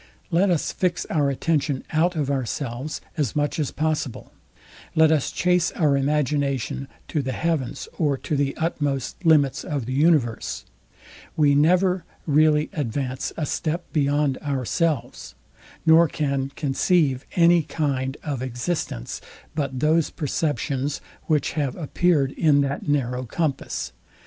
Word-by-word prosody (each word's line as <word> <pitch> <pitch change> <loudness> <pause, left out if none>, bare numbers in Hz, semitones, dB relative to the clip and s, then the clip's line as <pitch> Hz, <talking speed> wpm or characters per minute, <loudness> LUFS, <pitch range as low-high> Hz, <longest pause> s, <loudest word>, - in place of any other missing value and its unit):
Let 180 +4 +3
us 170 -4 +1
fix 180 -1 -1
our 145 -3 +2
attention 145 -1 0
out 170 +3 +2
of 145 -3 -1
ourselves 130 +1 -3 0.2
as 145 -8 -1
much 145 +1 0
as 150 - 0
possible: 155 -5 -2 0.6
Let 160 0 +5
us 155 -4 +1
chase 180 -1 +2
our 150 -4 +2
imagination 140 -1 0 0.2
to 150 - 0
the 130 -1 -3
heavens, 160 -6 -2
or 145 -4 +2
to 150 - -3
the 140 -1 0
utmost 145 -2 -2
limits 150 -5 +4
of 140 -5 -3
the 130 - -3
universe; 145 -6 +1 0.7
we 145 -2 +5
never 180 +5 +3 0.2
really 150 0 +3
advance 130 -2 -2
a 155 - -1
step 165 +4 -2
beyond 145 -2 +1
ourselves, 145 - -2 0.5
nor 165 +1 +7
can 140 -3 -1
conceive 140 -1 +1
any 170 0 +5
kind 140 -4 -2
of 140 -5 -3
existence, 125 - -3 0.3
but 135 -4 -2
those 160 +1 +3
perceptions, 145 -2 -2 0.3
which 150 -3 +1
have 145 -5 -1
appeared 155 -3 +1
in 145 -3 +3
that 140 +1 -2
narrow 130 -3 0
compass. 135 - -2
145 Hz, 130 wpm, -24 LUFS, 135-160 Hz, 0.7 s, nor